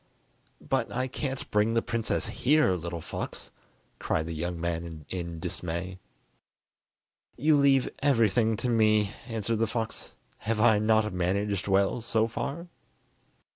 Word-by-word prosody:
"But - - 0
I 130 - -1
can't 135 +1 -4
bring 105 +2 +2
the 115 - +2
princess 115 -1 -1
here, 150 -3 +3
little 85 -1 -4
fox?" - - -6 0.5
cried 80 - 0
the 85 - -4
young 85 +2 -3
man 85 -2 -4
in 85 -3 -4
dismay. 90 +1 -4 1.4
"You 150 +4 +4
leave 140 -2 +4
everything 115 -4 +3
to 125 - -2
me," 110 -2 +3 0.2
answered 115 -1 -2
the 115 - +2
fox; 115 0 -4 0.3
"have 110 0 -1
I 110 -2 +5
not 110 -1 +2
managed 95 +2 -1
well 100 +4 +2
so 115 -1 +1
far?" 140 +8 -4
110 Hz, 135 wpm, -28 LUFS, 90-115 Hz, 1.4 s, I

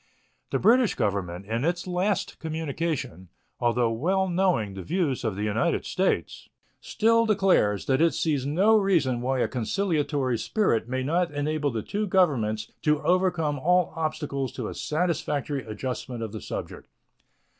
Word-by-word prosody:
The - - 0
British 240 0 +4
Government, 95 -2 -2
in 115 +4 -2
its 175 +2 -1
last 185 +2 -1
communication, 160 - -3 0.3
although 120 -1 +2
well 185 +11 +1
knowing 175 - +1
the 95 - -7
views 155 - -1
of 110 -4 -1
the 105 - -3
United 110 +11 0
States, 190 0 -1 0.3
still 230 +1 +2
declares 190 - +2
that 135 +2 +2
it 165 0 +3
sees 150 -5 0
no 185 +11 +3
reason 160 -12 +1
why 130 0 0
a - - +2
conciliatory 145 - -1
spirit 120 - 0
may 130 0 -1
not 170 +5 +1
enable 145 0 -1
the 115 -4 -3
two 210 +1 -2
Governments 120 - +1
to 150 -1 +2
overcome 175 -5 +1
all 180 +4 +2
obstacles 155 -4 -2
to - - -4
a - - -6
satisfactory 150 -4 -1
adjustment 120 +2 -5
of 110 - -5
the 110 -2 -7
subject. - - -6
150 Hz, 150 wpm, -26 LUFS, 120-180 Hz, 0.3 s, British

